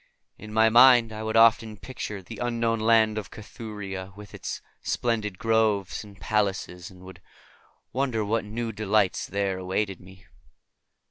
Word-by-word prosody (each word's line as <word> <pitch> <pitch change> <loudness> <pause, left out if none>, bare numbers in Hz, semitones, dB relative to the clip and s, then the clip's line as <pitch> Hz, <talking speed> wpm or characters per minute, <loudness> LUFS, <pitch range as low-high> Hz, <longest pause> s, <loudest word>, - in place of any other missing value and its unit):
In 105 +1 -11
my 110 +1 +4
mind 120 -1 +6
I 110 - -6
would 110 0 -1
often 115 -1 +4
picture 105 -3 -7
the - - -10
unknown 115 -2 0
Land 110 -1 +3
of 100 - -9
Cathuria 105 -4 -8
with 105 -1 -12
its - - -5 0.2
splendid 110 -5 -1
groves 110 -4 +1
and 100 -1 -15
palaces, 95 -4 -2
and 90 -1 -16
would 95 -1 -12 0.7
wonder 125 -4 0
what 110 +2 0
new 115 +2 -4
delights 105 -2 0
there 100 -1 -2
awaited 95 +1 -2
me. 95 +1 -16
105 Hz, 145 wpm, -26 LUFS, 95-115 Hz, 0.7 s, mind